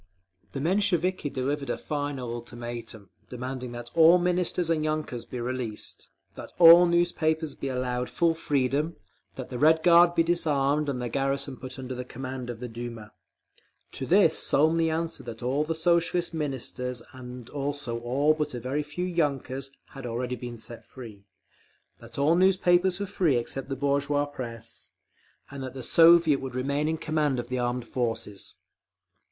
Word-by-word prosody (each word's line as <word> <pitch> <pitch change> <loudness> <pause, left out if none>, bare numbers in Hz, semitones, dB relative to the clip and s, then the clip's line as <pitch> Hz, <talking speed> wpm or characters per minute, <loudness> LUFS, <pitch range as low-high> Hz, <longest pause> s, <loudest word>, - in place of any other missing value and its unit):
_ - - -36
The 135 - -3
Mensheviki 185 -2 +1
delivered 140 +2 -2
a - - -1
final 145 -5 -4
ultimatum, 120 -4 -7 0.2
demanding 125 0 -5
that 120 0 -8
all 165 +2 +7
Ministers 180 -1 0
and 155 -2 +1
yunkers 155 -6 -3
be 125 - -5
released, 120 -3 -4 0.2
that - - -9
all 170 +1 +9
newspapers 160 -3 +1
be 140 - -5
allowed 125 -1 -2
full 170 -1 +2
freedom, 145 +1 0 0.4
that 130 - -7
the 125 - -5
Red 160 +2 +4
Guard 175 0 +6
be 165 - +4
disarmed 150 -3 +1
and 130 -3 -2
the 125 - -2
garrison 135 +2 -1
put 130 +1 -8
under 130 -1 -5
command 130 0 -6
of 120 -2 -6
the 125 - -5
Duma. 115 -2 -8 0.8
To - - -5
this - - +4
Smolny 160 +2 +3
answered 160 -4 -3
that 115 0 -7
all 135 +4 +1
the 160 +1 -2
Socialist 170 +1 +1
Ministers 125 -5 -4
and 125 -2 -9
also 140 -4 -3
all 135 +6 +2
but 150 -3 -3
a - - -4
very 130 +5 -2
few 150 +5 -4
yunkers 140 -6 -1 0.2
had 135 - -10
been 120 - -4
already 125 0 -4
set 115 +1 -7
free, 110 -6 -12 0.7
that 115 0 -12
all 145 +3 +3
newspapers 185 0 +3
were 200 - -2
free 180 -9 +1
except 135 +3 -4
the 135 - -2
bourgeois 140 +1 +1
press, 120 -4 -8 0.6
and 140 -1 -7
that 130 0 -6
the 130 - -6
Soviet 165 -1 +6
would 130 -2 -6
remain 140 +4 0
in 160 0 0
command 150 -4 0
of 120 0 -6
the 130 0 -2
armed 120 0 -1
forces…. 115 -5 -3
140 Hz, 165 wpm, -27 LUFS, 125-160 Hz, 0.8 s, all